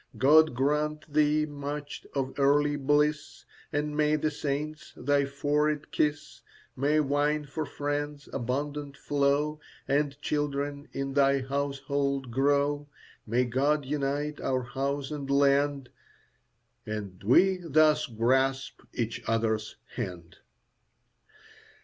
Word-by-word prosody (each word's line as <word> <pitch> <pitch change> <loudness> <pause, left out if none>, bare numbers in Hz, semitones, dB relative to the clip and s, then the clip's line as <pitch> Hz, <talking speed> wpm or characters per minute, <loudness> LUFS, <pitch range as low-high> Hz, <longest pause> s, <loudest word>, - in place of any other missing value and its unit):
God 150 +3 +5
grant 150 +3 -1
thee 150 0 +3
much 145 0 -6
of 135 -1 -1
earthly 145 +1 +3
bliss, 150 +2 0 0.3
And 150 0 -1
may 150 0 +3
the 155 0 0
saints 150 +1 -4
thy 140 +2 +2
forehead 150 +2 0
kiss. 150 -1 -1 0.3
May 145 +4 +2
wine 150 +1 +1
for 145 +2 -4
friends 145 0 -3
abundant 140 +3 -3
flow, 145 +1 +1 0.3
And 140 0 0
children 145 -1 -2
in 135 0 -3
thy 140 -1 +3
household 140 -1 -2
grow. 145 +3 +1 0.4
May 120 +3 +2
God 140 +4 +1
unite 145 +1 -2
our 130 -1 0
house 135 +3 -3
and 140 -2 -5
land, 140 -1 +2 1.0
As 105 0 -2 0.2
we 185 - +5
thus 155 -3 +3
grasp 130 +4 0
each 115 -1 -2
other's 110 -1 0 0.2
hand. 90 -8 -6
145 Hz, 110 wpm, -28 LUFS, 135-150 Hz, 1.0 s, God